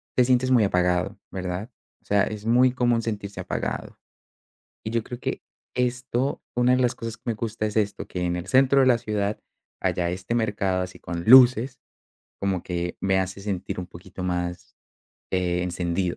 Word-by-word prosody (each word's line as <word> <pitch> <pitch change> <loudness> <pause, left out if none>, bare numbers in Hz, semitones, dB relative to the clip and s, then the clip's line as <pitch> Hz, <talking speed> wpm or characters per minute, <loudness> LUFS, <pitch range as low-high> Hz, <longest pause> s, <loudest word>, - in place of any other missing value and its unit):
te 125 - +5
sientes 130 +1 +2
muy 120 -4 +5
apagado, 90 -2 +1
¿verdad? 95 +5 -4 0.3
O - - -37
sea, 100 0 +3
es 105 0 -6
muy 125 +3 +5
común 120 -2 +2
sentirse 105 -3 -5
apagado. - - -4 0.9
Y 110 - -4
yo 115 -1 0
creo 120 +1 -7
que, - - -3 0.3
esto, 125 +1 -1
una 125 +1 +3
de 130 - +1
las 125 -1 +2
cosas 115 -1 -5
que 115 - -34
me 115 - +1
gusta 110 0 -3
es 105 0 -2
esto, 105 -1 -1
que 90 -1 -3
en 85 0 0
el 90 +1 -5
centro 135 +3 +5
de 130 - +4
la 125 -2 +5
ciudad 105 -2 -2 0.4
haya 90 -1 0
este 95 +6 -3
mercado 100 -5 0
así 90 0 -6
con 85 -1 -5
luces, 130 +2 +7 0.6
como 95 -3 0
que 85 -1 -3
me 95 0 +2
hace 95 +1 -3
sentir 100 -1 -3
un - - -6
poquito 90 +1 -9
más, 90 -1 -3 0.6
eh, 90 -1 0
encendido 90 0 -1
105 Hz, 180 wpm, -25 LUFS, 90-120 Hz, 0.9 s, luces